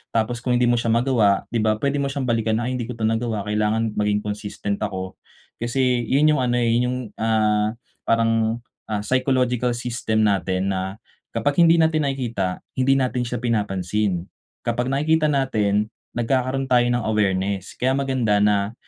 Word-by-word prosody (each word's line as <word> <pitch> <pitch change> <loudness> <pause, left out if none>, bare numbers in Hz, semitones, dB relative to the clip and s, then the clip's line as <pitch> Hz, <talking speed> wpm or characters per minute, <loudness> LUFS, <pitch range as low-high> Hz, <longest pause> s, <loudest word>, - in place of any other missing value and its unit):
Tapos 115 +2 +1
kung 125 +1 -1
hindi 120 0 +3
mo 120 - +2
siya 115 - -2
magawa, 115 -5 +2
'di 120 - 0
ba. 110 0 +2
Pwede 140 +1 +1
mo 140 - 0
siyang 135 0 -3
balikan 115 -1 +1
na, 125 - -2
"Ay, 130 - -2
hindi 120 - -3
ko 125 - -5
'to 115 - -6
nagawa, 115 -1 -1
kailangan 105 +2 0
maging 105 0 +1
consistent 105 -1 -4
ako." 95 -3 -4 0.4
Kasi 125 0 0
yun 145 +3 +4
yung - - 0
ano, 120 0 +1
eh, 120 -1 +2
yun 120 +1 +2
yung, 125 +1 -2 0.2
ah, 110 -1 +2 0.3
parang, 115 0 +1 0.3
ah, 105 -2 -2
psychological 125 -1 +1
system 115 -2 -1
natin 95 -1 +1
na, 95 0 -3 0.4
kapag 140 +8 0
hindi 165 0 +6
natin 160 -2 +2
nakikita, 115 -9 -2 0.2
hindi 130 +1 +3
natin 125 -2 0
siya 120 - -3
pinapansin. 100 -4 -1 0.4
Kapag 120 +2 -1
nakikita 155 +3 +2
natin 110 -7 +1 0.2
nagkakaroon 130 +2 -1
tayo 125 -2 +3
ng 120 -2 0
awareness. 100 -2 -1
Kaya 130 +1 +1
maganda 130 -7 +1
na 105 0 +2
115 Hz, 170 wpm, -22 LUFS, 105-125 Hz, 0.4 s, hindi